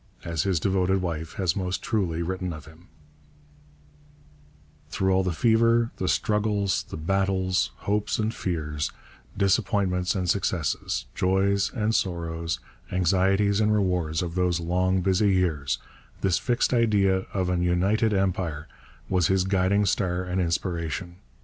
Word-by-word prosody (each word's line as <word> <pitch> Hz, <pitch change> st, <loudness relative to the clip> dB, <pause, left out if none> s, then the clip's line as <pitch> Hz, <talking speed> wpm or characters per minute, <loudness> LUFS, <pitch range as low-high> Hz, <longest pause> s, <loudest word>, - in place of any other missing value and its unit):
As 85 Hz, -3 st, -1 dB
his 95 Hz, -1 st, +1 dB
devoted 95 Hz, +1 st, +1 dB
wife 80 Hz, -2 st, -4 dB
has 90 Hz, -4 st, 0 dB
most 90 Hz, -1 st, -2 dB
truly 90 Hz, -7 st, -1 dB
written 90 Hz, 0 st, -3 dB
of 75 Hz, -3 st, -9 dB
him: 80 Hz, +3 st, -17 dB, 2.0 s
Through 95 Hz, 0 st, +1 dB
all 95 Hz, -, +3 dB
the 90 Hz, -1 st, -1 dB
fever, 115 Hz, +4 st, +3 dB
the 95 Hz, -, -2 dB
struggles, 105 Hz, -2 st, +1 dB
the -, -, -6 dB
battles, 95 Hz, +1 st, 0 dB
hopes 105 Hz, +8 st, -1 dB
and 110 Hz, +1 st, -1 dB
fears, 75 Hz, -4 st, -3 dB, 0.5 s
disappointments 95 Hz, -2 st, +1 dB
and 90 Hz, -2 st, -1 dB
successes, 85 Hz, -9 st, -1 dB
joys 100 Hz, +3 st, +1 dB
and 110 Hz, -1 st, 0 dB
sorrows, 85 Hz, -, -2 dB, 0.3 s
anxieties 95 Hz, +3 st, +2 dB
and 105 Hz, 0 st, +3 dB
rewards 90 Hz, -6 st, 0 dB
of 85 Hz, -2 st, -4 dB
those 90 Hz, -1 st, +1 dB
long 90 Hz, +2 st, +1 dB
busy 95 Hz, +2 st, +2 dB
years, 80 Hz, -7 st, 0 dB, 0.4 s
this 95 Hz, -3 st, +2 dB
fixed 120 Hz, 0 st, +1 dB
idea 100 Hz, -5 st, +2 dB
of 95 Hz, -2 st, -1 dB
an 90 Hz, -1 st, 0 dB
united 95 Hz, +6 st, +2 dB
Empire 90 Hz, -6 st, -1 dB, 0.4 s
was 90 Hz, -4 st, +2 dB
his 95 Hz, -1 st, +2 dB
guiding 95 Hz, +2 st, +2 dB
star 90 Hz, -2 st, 0 dB
and 90 Hz, +1 st, -1 dB
inspiration. 85 Hz, 0 st, -2 dB
95 Hz, 135 wpm, -26 LUFS, 85-100 Hz, 2.0 s, all